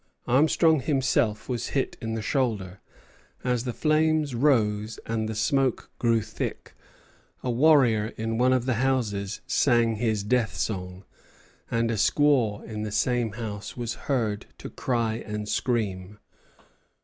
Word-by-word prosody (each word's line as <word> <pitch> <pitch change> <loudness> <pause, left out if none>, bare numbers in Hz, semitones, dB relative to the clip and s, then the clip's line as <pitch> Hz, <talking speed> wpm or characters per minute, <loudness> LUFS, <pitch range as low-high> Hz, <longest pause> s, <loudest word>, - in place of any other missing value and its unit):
Armstrong 155 +4 +4
himself 130 -6 0
was 120 -2 -2
hit 135 - -1
in 115 -1 -3
the 110 - -4
shoulder. 105 -10 -1 0.6
As 125 -1 0
the 125 - -1
flames 155 0 +1
rose 110 -5 +1
and 110 -1 -2
the 110 - -4
smoke 130 +3 0
grew 115 -2 +2
thick, - - -5 0.7
a 125 - 0
warrior 120 -5 +4
in 115 +1 -2
one 130 +1 +4
of 130 -2 +2
the 130 - +1
houses 110 -7 -1
sang 120 -4 +2
his 110 -2 0
death 115 +1 0
song, 90 -2 -4 0.6
and 115 0 0
a 110 - -1
squaw 125 -4 +2
in 110 -1 -6
the 110 -1 -4
same 120 0 0
house 105 -2 -6
was 120 -2 -3 0.2
heard 110 -7 0
to - - -9
cry 115 -3 -1
and 105 0 -5
scream. 105 -5 -2
115 Hz, 140 wpm, -26 LUFS, 105-130 Hz, 0.7 s, Armstrong